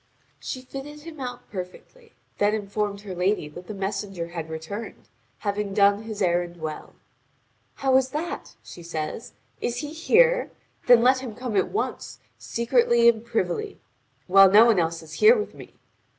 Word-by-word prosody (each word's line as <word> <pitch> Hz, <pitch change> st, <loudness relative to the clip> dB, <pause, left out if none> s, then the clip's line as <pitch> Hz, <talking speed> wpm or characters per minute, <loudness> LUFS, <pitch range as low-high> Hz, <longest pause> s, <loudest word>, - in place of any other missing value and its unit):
She 255 Hz, -, -6 dB
fitted 275 Hz, +3 st, -9 dB
him 315 Hz, -1 st, -11 dB
out 250 Hz, -2 st, -6 dB
perfectly, 210 Hz, -, -9 dB, 0.3 s
then 205 Hz, +1 st, +3 dB
informed 205 Hz, -1 st, -3 dB
her 200 Hz, -2 st, -7 dB
lady 180 Hz, -2 st, 0 dB
that 175 Hz, +4 st, -11 dB
the 215 Hz, -, -6 dB
messenger 195 Hz, -3 st, -4 dB
had 165 Hz, -2 st, -6 dB
returned, 160 Hz, +8 st, -7 dB, 0.3 s
having 200 Hz, -1 st, -3 dB
done 200 Hz, 0 st, +4 dB
his 215 Hz, -2 st, -4 dB
errand 175 Hz, -1 st, 0 dB
well. 155 Hz, -2 st, -7 dB, 0.8 s
"How 265 Hz, -1 st, +1 dB
is 265 Hz, 0 st, +1 dB
that?" 315 Hz, +5 st, -5 dB
she 175 Hz, -, -11 dB
says, 165 Hz, +4 st, -5 dB, 0.3 s
"is 240 Hz, 0 st, -2 dB
he 295 Hz, +1 st, -6 dB
here? -, -, +3 dB, 0.4 s
Then 245 Hz, -2 st, +7 dB
let 260 Hz, +1 st, +4 dB
him 245 Hz, -5 st, -7 dB
come 245 Hz, -2 st, -4 dB
at 190 Hz, -, +2 dB
once, 420 Hz, -, -4 dB, 0.2 s
secretly 235 Hz, 0 st, +2 dB
and 225 Hz, -1 st, +4 dB
privily, 235 Hz, -, -2 dB, 0.5 s
while 195 Hz, +1 st, +7 dB
no 210 Hz, +4 st, +8 dB
one 225 Hz, -5 st, +4 dB
is 165 Hz, -1 st, -3 dB
here 455 Hz, +3 st, +6 dB
with 425 Hz, -, -4 dB
me. -, -, -13 dB
215 Hz, 160 wpm, -25 LUFS, 185-260 Hz, 0.8 s, no